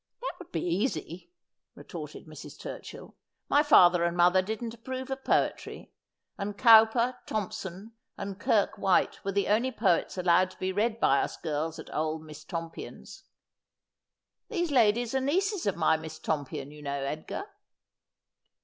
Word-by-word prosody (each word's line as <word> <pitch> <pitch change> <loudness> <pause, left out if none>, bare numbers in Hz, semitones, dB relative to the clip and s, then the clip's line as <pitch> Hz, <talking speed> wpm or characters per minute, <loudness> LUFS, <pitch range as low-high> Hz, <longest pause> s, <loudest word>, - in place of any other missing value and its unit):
' - - -56
That - - -3
would 360 - -12
be 165 - -2
easy,' 185 - -2 0.4
retorted - - -9
Mrs. - - -11
Turchill. - - -9 0.2
' - - -54
My 290 - +6
father 180 - +6
and 170 0 0
mother 180 +2 +5
didn't 220 +4 -4
approve 260 +3 -6
of 265 0 -4
poetry, - - -1 0.5
and 200 0 -4
Cowper, 230 +2 +6
Thomson, 200 0 -5 0.3
and 195 -1 -6
Kirke 205 0 +1
White 190 -2 +2
were 195 - -1
the 200 +1 0
only 235 +5 +2
poets 195 -6 +1
allowed 180 +1 +3
to - - -17
be 185 0 -2
read 220 +4 0
by 140 -9 +4
us - - -4
girls 155 0 -3
at - - -10
old 155 0 -2
Miss 155 -1 -11
Tompion's 165 -2 -8 0.6
— - - -61
these 345 -8 -1
ladies 235 -1 +3
are 265 - +1
nieces 375 - 0
of 200 - +1
my 160 -1 +3
Miss 160 0 -8
Tompion, 145 -3 -3
you 150 0 -12
know, 140 -1 -3
Edgar.' 155 - -4
195 Hz, 160 wpm, -29 LUFS, 165-235 Hz, 0.6 s, My